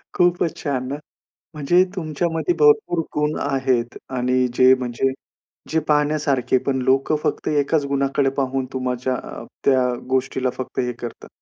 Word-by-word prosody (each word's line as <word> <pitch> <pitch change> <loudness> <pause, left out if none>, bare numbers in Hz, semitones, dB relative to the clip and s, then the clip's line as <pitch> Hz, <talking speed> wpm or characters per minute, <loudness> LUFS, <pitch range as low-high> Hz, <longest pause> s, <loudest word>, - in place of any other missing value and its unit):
खूपच 175 -2 +2
छान 130 -4 -1
ना, 140 - -2 0.6
म्हणजे 165 +5 +4
तुमच्यामध्ये 165 - -1
भरपूर 440 - +4 0.2
गुण 150 +1 0
आहेत 130 -4 0 0.2
आणि 125 +1 +2
जे 130 +1 +6
म्हणजे 125 +2 -1 0.6
जे 160 - +2
पाहण्यासारखे 150 -4 +2
पण 130 -2 0
लोकं 135 +4 +2
फक्त - - -1
एकाच 145 0 +1
गुणाकडे 140 0 +1
पाहून 135 -1 0
तुमच्या 130 0 -2
अ, - - -7 0.2
त्या 130 -2 +3 0.2
गोष्टीला 130 0 0
फक्त 130 - -6
हे 125 -1 -1
करतात. 120 0 -9
135 Hz, 135 wpm, -21 LUFS, 130-150 Hz, 0.6 s, जे